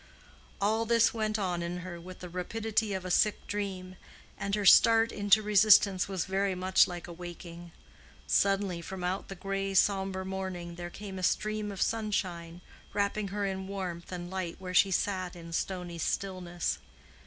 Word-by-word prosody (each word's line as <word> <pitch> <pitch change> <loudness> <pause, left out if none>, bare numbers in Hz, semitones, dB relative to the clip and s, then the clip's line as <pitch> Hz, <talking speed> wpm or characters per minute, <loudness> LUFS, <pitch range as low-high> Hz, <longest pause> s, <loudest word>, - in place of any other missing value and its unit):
All 220 +3 +1
this 230 0 +4
went 215 -1 -1
on 180 -4 -1
in 175 +1 -4
her 175 -2 -7
with 185 +1 -11
the 180 - -6
rapidity 215 +4 -1
of 190 -1 -4
a 185 - -3
sick 210 +3 +2
dream; 190 -3 -4 0.4
and 200 0 -2
her 205 -1 -2
start 225 +3 +7
into 205 +1 +3
resistance 205 -2 +5
was 190 -3 -2
very 195 0 0
much 185 +1 +4
like 175 -1 -7
a 175 - -8
waking. 175 0 -9 0.5
Suddenly 195 -3 +1
from 185 +2 -7
out 185 +2 -2
the 195 - -7
gray 195 +1 -3
sombre 190 -1 +2
morning 185 -2 -5
there 175 0 -6
came 195 +1 -8
a - - -5
stream 215 +3 0
of 195 - 0
sunshine, 180 -6 -2 0.3
wrapping 205 0 0
her 200 +1 -2
in 190 -1 -3
warmth 185 -3 -5
and 175 0 -6
light 185 -3 -3
where 185 -1 -7
she 195 +2 +5
sat 185 -1 -1
in 170 -1 -9
stony 175 -1 -3
stillness. 180 -1 -2
190 Hz, 170 wpm, -30 LUFS, 180-205 Hz, 0.5 s, start